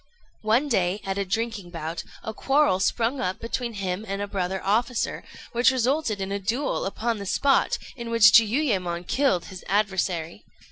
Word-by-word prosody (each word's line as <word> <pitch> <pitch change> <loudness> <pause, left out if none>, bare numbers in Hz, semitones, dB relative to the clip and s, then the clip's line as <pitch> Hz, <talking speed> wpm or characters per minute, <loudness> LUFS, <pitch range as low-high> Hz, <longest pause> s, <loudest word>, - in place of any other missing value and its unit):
One 225 +7 +2
day, 190 -6 +1
at 195 0 -2
a 200 - -1
drinking 215 -1 -3
bout, 165 -1 -5 0.2
a 220 - -5
quarrel 270 -5 +2
sprung 235 +6 0
up 185 -6 -2
between 235 0 -3
him 195 -1 -3
and 195 0 -3
a 205 - -1
brother 190 -1 -2
officer, 230 +5 0 0.3
which 240 +1 +4
resulted 260 -3 0
in 195 0 -3
a 200 - -1
duel 230 +4 -1
upon 225 +2 -2
the 200 - -6
spot, 275 +7 +2 0.2
in 235 -3 -6
which 230 -2 +7
Jiuyémon 205 - +2
killed 255 -11 +1
his 185 -1 -10
adversary. 190 -3 -1
210 Hz, 170 wpm, -25 LUFS, 190-235 Hz, 0.3 s, which